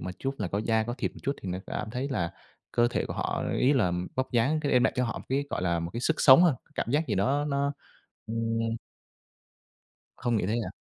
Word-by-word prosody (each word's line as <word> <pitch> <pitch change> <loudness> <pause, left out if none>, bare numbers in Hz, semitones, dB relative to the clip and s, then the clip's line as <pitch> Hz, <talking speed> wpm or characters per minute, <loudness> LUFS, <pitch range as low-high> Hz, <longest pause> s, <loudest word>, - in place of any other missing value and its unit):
một 90 - -4
chút 135 +1 -2
là 100 -4 -2
có 100 - -1
da 110 0 +2
có 120 +2 -3
thịt - - -1
một - - -12
chút, 140 - 0
thì 95 - -5
nó 90 +1 -2
cảm 110 - -4
thấy 130 +3 -3
là 85 -11 -1 0.4
cơ 120 0 +4
thể - - -1
của - - -4
họ - - -1 0.2
ý 135 +3 +4
là 105 -10 +2 0.2
vóc 130 0 -2
dáng 130 +6 +2
sẽ 145 - 0
đem 125 -1 +4
lại - - +3
cho 125 - +2
họ 115 - -3
một - - -11
cái, 140 +2 +1
gọi - - -2
là, 85 -2 +1
một 85 +1 -4
cái 115 - -3
sức 160 +5 0
sống 135 +5 +9
hơn, 165 -7 +5 0.2
cảm 115 - -2
giác 155 +3 +2
gì 110 - 0
đó 135 +10 +1
nó, 140 0 0 0.5
ừm 115 0 -1 1.4
Không 120 -3 0
nghĩ 95 - 0
thế 105 - 0
à? - - -5
120 Hz, 255 wpm, -28 LUFS, 110-140 Hz, 1.4 s, sống